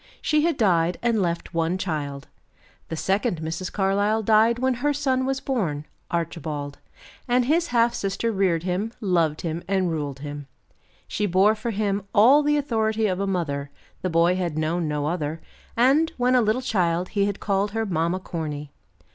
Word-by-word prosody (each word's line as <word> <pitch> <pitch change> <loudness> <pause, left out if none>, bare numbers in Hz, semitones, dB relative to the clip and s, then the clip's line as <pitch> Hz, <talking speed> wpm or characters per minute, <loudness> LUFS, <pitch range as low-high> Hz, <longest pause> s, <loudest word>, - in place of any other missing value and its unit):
She 305 -1 +2
had 335 -4 +1
died 175 -6 +2
and 230 -3 +2
left 170 0 -2
one 165 +2 0
child. 145 -6 -4 0.6
The 165 - -3
second 195 +2 0
Mrs. 165 +3 -4
Carlyle 205 +3 +1
died 220 +2 +4
when 260 +1 +1
her 290 +1 +2
son 260 -2 0
was 270 0 -1
born 175 - -2 0.2
Archibald; 155 -4 -4 0.5
and 245 0 +2
his 330 +5 +2
half 235 -3 +2
sister 200 +4 -1
reared 185 -5 +1
him, 190 +5 -2
loved 170 -7 +1
him 165 0 -3
and 190 -3 +1
ruled 145 -4 -4
him. 145 -1 -7 0.6
She 210 - -1
bore 195 +3 +4
for 220 +2 -4
him 205 -2 -1
all 250 +8 +7
the 295 0 +2
authority 220 -5 0
of 185 -2 0
a 200 - -1
mother; 145 -7 -2 0.3
the 185 - -1
boy 170 +2 +3
had 175 -4 -2
known 160 +1 0
no 150 -1 -1
other, 155 -1 -2 0.4
and, 280 +7 +4
when 250 0 +2
a 250 - +5
little 225 +4 +1
child 180 -6 0
he 200 -2 +1
had 200 -1 -3
called 200 0 0
her 225 0 -1
Mamma 170 -1 0
Corny. 150 -5 -5
190 Hz, 175 wpm, -24 LUFS, 165-225 Hz, 0.6 s, all